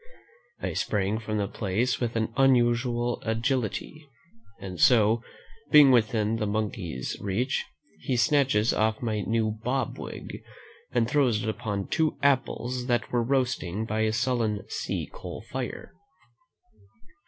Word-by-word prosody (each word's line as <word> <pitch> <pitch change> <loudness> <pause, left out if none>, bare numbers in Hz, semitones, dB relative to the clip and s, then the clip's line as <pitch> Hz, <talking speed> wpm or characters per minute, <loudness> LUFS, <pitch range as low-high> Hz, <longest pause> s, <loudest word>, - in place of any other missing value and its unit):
I - - -3
sprang 105 +1 0
from 110 -1 -3
the 100 -1 0
place 110 +6 -1
with 120 -2 -2
an 115 0 -1
unusual 120 -2 +2
agility, 125 +5 -2 0.5
and 95 -3 -7
so, 110 +3 +5 0.5
being 145 -3 +8
within 115 -2 +2
the 110 -2 -1
monkey's 100 - -3
reach, 110 +7 -1 0.3
he 125 +10 -1
snatches 130 -5 +3
off 110 +2 0
my 110 -2 -1
new 110 0 0
bob 125 +5 -2
wig, - - -7 0.5
and 115 - +2
throws 125 -6 +2
it 110 - -1
upon 105 -4 -3
two 160 -2 0
apples 130 -2 0
that 120 -2 0
were 120 - +2
roasting 115 -6 -1
by 110 0 -2
a 110 0 +2
sullen 115 -3 0
sea - - -3
coal - - -8
fire. - - -5
115 Hz, 130 wpm, -27 LUFS, 110-125 Hz, 0.5 s, being